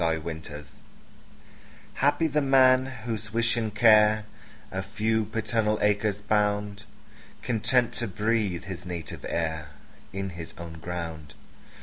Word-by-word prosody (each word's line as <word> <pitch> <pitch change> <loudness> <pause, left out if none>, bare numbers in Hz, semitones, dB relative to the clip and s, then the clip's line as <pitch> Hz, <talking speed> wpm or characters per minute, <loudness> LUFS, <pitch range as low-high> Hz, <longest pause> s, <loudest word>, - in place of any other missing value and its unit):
Y 80 -1 +2
Z 80 - -5
Solitude 75 -3 -7 1.3
HAPPY 145 +4 +2
the 150 +1 +1
man, 130 -1 +5 0.2
whose 110 -2 -4
wish 115 +2 +1
and 110 -3 -2
care 110 -1 +6 0.5
A 95 - -2
few 110 +2 0
paternal 110 0 0
acres 105 0 +1
bound, 105 -1 0 0.6
Content 120 +1 +1
to 120 - -2
breathe 105 -3 0
his 95 -2 -7
native 85 -2 -6
air 80 -2 -2 0.4
In 95 0 -4
his 85 -2 -9
own 85 -1 -8
ground. 80 -3 -6
105 Hz, 125 wpm, -27 LUFS, 85-115 Hz, 1.3 s, care